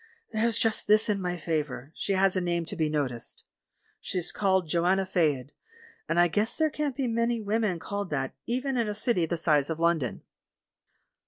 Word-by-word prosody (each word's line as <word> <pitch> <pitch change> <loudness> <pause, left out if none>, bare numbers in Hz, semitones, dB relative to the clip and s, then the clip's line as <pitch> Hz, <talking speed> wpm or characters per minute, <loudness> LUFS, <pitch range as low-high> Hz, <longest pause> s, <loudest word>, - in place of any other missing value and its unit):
There's 225 0 +1
just 225 -1 0
this 215 +1 +4
in 200 -2 +1
my 180 -1 -2
favour, 150 -4 -3
she 200 - -2
has 190 0 +3
a 185 - +1
name 170 -1 -1
to - - -5
be 155 -2 0
noticed. 135 -6 -3 0.6
She's 180 -2 -3
called 190 -3 +1
'Joanna 180 +4 +2
Faed,' 150 -7 0 0.6
and 165 +1 +2
I 175 - +6
guess 210 +7 +1
there 315 -1 +1
can't 290 -2 -2
be 270 - -1
many 230 0 0
women 210 -3 0
called 200 +2 -4
that, 135 -3 -2
even 255 +2 -1
in 235 -2 +1
a 210 - -3
city 210 -6 +1
the 170 - -1
size 150 -3 +3
of 160 0 -3
London." 165 -7 0
185 Hz, 185 wpm, -28 LUFS, 160-220 Hz, 0.6 s, I